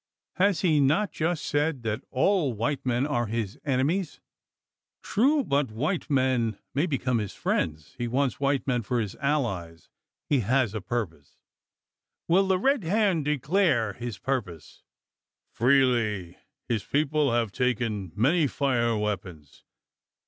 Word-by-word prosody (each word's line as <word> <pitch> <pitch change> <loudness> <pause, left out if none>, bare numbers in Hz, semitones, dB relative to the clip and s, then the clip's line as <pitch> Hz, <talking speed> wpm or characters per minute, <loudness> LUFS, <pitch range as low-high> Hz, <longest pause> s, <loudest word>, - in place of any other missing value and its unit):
"Has 195 -2 +2
he 160 -5 +3
not 155 +9 +2
just 165 0 -2
said, 145 -3 0
that 110 -1 -2
all 150 -1 +2
white 125 +6 -2
men 125 +2 +1
are 120 -6 -1
his 110 -2 -3
enemies?" 145 +7 0 0.8
"True. 275 +7 +2
But 140 - 0
white 150 - -2
men 130 -6 +1 0.2
may 145 +6 +1
become 130 -5 0
his 105 -3 -5
friends. 75 - -2
He 120 - -1
wants 130 +2 0
white 140 -1 +1
men 125 -3 0
for 120 +3 -1
his 105 -4 -3
allies. 100 - -2 0.4
He 145 - +2
has 120 0 +1
a 110 - -3
purpose." 90 - -5 0.9
"Will 190 +3 +4
the 190 -1 +3
Red 270 +3 +1
Hand 185 -3 +1
declare 150 - +1
his 120 -3 -6
purpose?" 100 - -4 0.7
"Freely. 120 -8 +2 0.3
His 115 -4 -1
people 150 -1 +1
have 115 -3 +1
taken, 115 -6 -1
many 150 +7 +3
fire 120 -5 0
weapons. 95 -9 -5
130 Hz, 135 wpm, -27 LUFS, 110-150 Hz, 0.9 s, Will